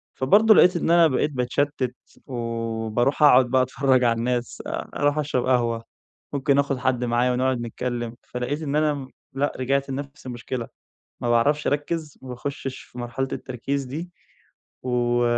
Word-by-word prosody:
فبرضه 210 +11 +5
لقيت 180 +1 +6
إن 165 - -1
أنا 170 -1 +7
بقيت 145 +1 0
باتشتت، 130 0 -1 0.3
وباروح 115 +2 -1
أقعد 130 -3 +7
بقى 130 +1 +2
أتفرج 130 0 +2
على 115 -1 +3
الناس، 125 +1 -2
آآ - - -4
أروح 145 +1 +1
أشرب 145 -4 0
قهوة، 120 -3 +1 0.5
ممكن 140 0 +2
آخد 140 -1 +1
حد 125 -1 0
معايا 120 +1 +2
ونقعد 130 -1 0
نتكلم، 120 0 -4
فلقيت 125 +5 -4
إن 145 -2 -2
أنا، 150 0 +3
م 135 -2 -6 0.3
لأ، 140 +2 0
رجعت 135 +2 0
لنفس 140 +1 -6
المشكلة، 120 0 -5 0.5
ما 120 - -1
باعرفش 145 +6 +2
أركز، 150 +1 -2
ما 130 - -10
باخشش 135 +1 -5
في 125 - -14
مرحلة 120 +2 -3
التركيز 135 +2 -3
دي، 155 +7 -6 0.7
و 120 -1 +1
130 Hz, 155 wpm, -24 LUFS, 120-145 Hz, 0.7 s, أنا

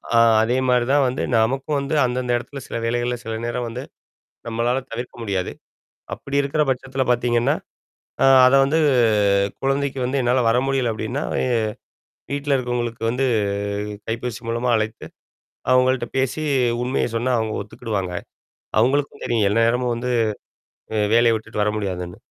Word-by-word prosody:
ஆ - - +6 0.3
அதே 120 +3 +1
மாரி 125 -1 +3
தான் 145 -1 +4
வந்து 125 - -2
நமக்கும் 135 +6 +1
வந்து 140 +3 -2
அந்தந்த 125 0 -1
இடத்துல 135 +3 -8
சில - - -4
வேலைகள்ல 120 +1 0
சில 115 0 -4
நேரம் 120 +1 -2
வந்து 125 +3 -6 0.6
நம்மளால 120 +3 0
தவிர்க்க 120 +1 -6
முடியாது. 95 -4 -2 0.6
அப்படி 140 - -6
இருக்கிற 140 +2 0
பட்சத்தல 130 +1 -1
பார்த்தீங்கன்னா. 120 -1 +2 0.7
அ - - +6 0.2
அத 130 - +4
வந்து 145 +4 +1 0.8
குழந்தைக்கு 135 0 0
வந்து 135 +2 0
என்னால 125 +1 +2
வர 115 - +3
முடியல 135 -3 +1
அப்படின்னா, 120 +7 -3 0.2
எ - - +1 0.9
வீட்ல 140 0 0
இருக்கவங்களுக்கு 120 -2 -3
வந்து 125 +3 0 0.8
கைபேசி 115 0 -4
மூலமா 120 +2 -1
அழைத்து, 110 0 -2 0.7
அவங்கள்ட்ட 130 -1 +3
பேசி 135 +4 -1 0.4
உண்மைய 130 +2 0
சொன்னா 120 +3 0
அவங்க 110 -1 -2
ஒத்துக்கிடுவாங்க. 100 -3 -4 0.7
அவங்களுக்கும் 140 +5 +1
தெரியும். 110 -4 +2
எல்ல 105 - 0
நேரமும் 120 +1 +1
வந்து 125 +1 -3 0.8
அ - - 0 0.2
வேலைய 115 -1 +5
விட்டுட்டு 105 -1 -4
வர 105 - +1
முடியாதுன்னு. 90 -3 -4
120 Hz, 145 wpm, -22 LUFS, 115-130 Hz, 0.9 s, ஆ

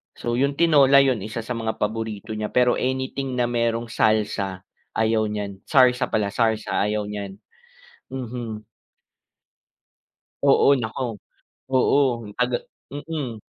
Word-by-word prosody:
So 120 0 -2
yung 140 +1 +1
tinola, 140 -4 +6
yun, 130 -4 +1
isa 110 +2 -4
sa 125 - -8
mga 110 -1 -2
paborito 110 0 -4
niya 110 0 -3
pero 125 -1 +3
anything 130 0 -2
na 125 - +1
merong 115 -1 -1
salsa, 105 -4 0 0.3
ayaw 110 0 +2
niyan. 100 -2 -5
Sarsa 125 -2 +4
pala, 100 -2 -1
sarsa, 110 -1 0
ayaw 105 0 -1
niyan. 100 -1 -6 0.7
Mhm. 120 -4 -6 1.8
Oo, 140 0 +5
naku. 115 -1 -4 0.5
Oo. 130 -3 +2
Antaga 125 0 0 0.3
mm, 145 -5 -5
115 Hz, 120 wpm, -23 LUFS, 110-130 Hz, 1.8 s, tinola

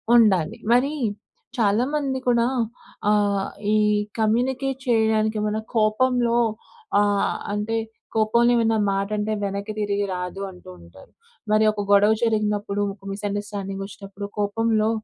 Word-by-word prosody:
ఉండాలి. 195 -9 +4
మరి 260 +5 +3 0.6
చాలామంది 260 +6 +1
కూడా 235 -1 +3 0.6
ఆహ్, 205 -2 +2 0.2
ఈ - - +4 0.4
కమ్యూనికేట్ 255 +4 0
చేయడానికి 220 -1 +2
ఏమైనా 215 +1 -1
కోపంలో 235 +2 +2 0.6
ఆహ్, 205 -1 +2 0.2
అంటే, 210 +2 -2 0.4
"కోపంలో 235 +2 +3
ఏమన్నా 225 -1 +2
మాట 195 0 -1
అంటే 210 +1 -1
వెనక్కి 200 +2 -3
తిరిగి 205 -1 0
రాదు" 180 +2 -5
అంటూ 180 - -14
ఉంటారు. 85 +2 -16 0.4
మరి 215 0 +4
ఒక 210 -1 -4
గొడవ 205 +2 +6
జరిగినప్పుడు, 210 -2 0
ఒక 195 0 -14
మిస్‌అండర్‌స్టాండింగ్ 200 -1 -4
వచ్చినప్పుడు, 200 0 -8
కోపంలో 215 +1 +1
215 Hz, 115 wpm, -23 LUFS, 200-230 Hz, 0.6 s, గొడవ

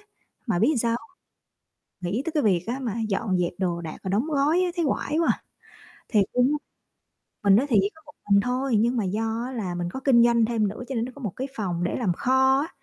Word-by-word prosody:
á, - - -26 0.4
mà 180 -6 +1
biết 250 - +3
sao 235 - +1
hông? 245 +8 -4 1.0
Nghĩ 225 +7 0
tới 330 - -2
cái 305 -2 0
việc 185 -5 +2
á, 250 +3 -2
mà 235 -5 -2 0.2
dọn 195 -2 0
dẹp 175 -1 0
đồ 175 -2 -1
đạc 160 -2 -7
và 190 - -3
đóng 205 +7 +1
gói 305 +3 +2
á, 365 - +1
thấy 340 -3 0
oải 295 +2 -1
quá 335 - +2
à. - - -6 0.7
Thiệt 210 -5 +3
luôn 250 +3 +3
á - - +1 0.9
mình 200 -1 +6
nói 255 +6 +2
thiệt 230 -8 +3 0.2
có 320 - -19
một 300 - -13 0.2
mình 200 0 +6
thôi 250 +2 0
nhưng 235 +3 +2
mà 225 - 0
do 225 +4 -1
á 260 - -6
là 200 -8 -3
mình 175 0 -3
có 265 - -5
kinh 260 -3 +5
doanh 235 -1 +4
thêm 220 -2 +1
nữa 210 +5 -6
cho 270 - -4
nên 230 - 0
nó 255 - -7
có 285 - -12
một 210 -6 -3
cái 265 +2 -3
phòng 180 -5 -2
để 175 - -1
làm 215 -8 0
kho 265 +6 +3
á. 310 - -3
235 Hz, 255 wpm, -25 LUFS, 200-265 Hz, 1.0 s, mình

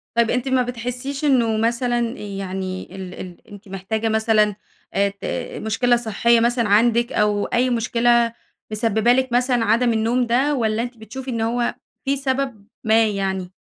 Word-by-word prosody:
طَب 235 -1 +3
أنتِ 250 +1 -1
ما 260 -1 +2
بتحسّيش 250 +4 -4
إنه 235 -6 +3
مثلًا 240 +2 +1 0.2
يعني 190 -2 -5
ال 185 -2 -7
ال 180 -1 -10
أنتِ 205 +1 -12
محتاجة 215 +4 -2
مثلًا 220 -1 +2 0.4
آآ 200 0 +2
ت 200 0 -11 0.4
مشكلة 240 +3 +2
صحية 235 0 +2
مثلًا 235 -1 +1
عندِك، 235 +3 +3
أو 210 -1 +1
أي 250 +1 +1
مشكلة 235 0 +2 0.4
مسببة 220 +2 +2
لِك 260 0 0
مثلًا 245 -1 +2
عدم 230 +2 +3
النوم 230 +3 +1
ده، 265 +5 +2
والّا 220 -3 0
أنتِ 245 0 -7
بتشوفي 255 +4 -7
إن 230 -2 -2
هو 235 +2 0 0.3
في 275 +1 +1
سبب 265 -5 -2 0.2
ما 220 0 +4
يعني؟ 190 -3 -2
230 Hz, 160 wpm, -21 LUFS, 210-245 Hz, 0.4 s, ما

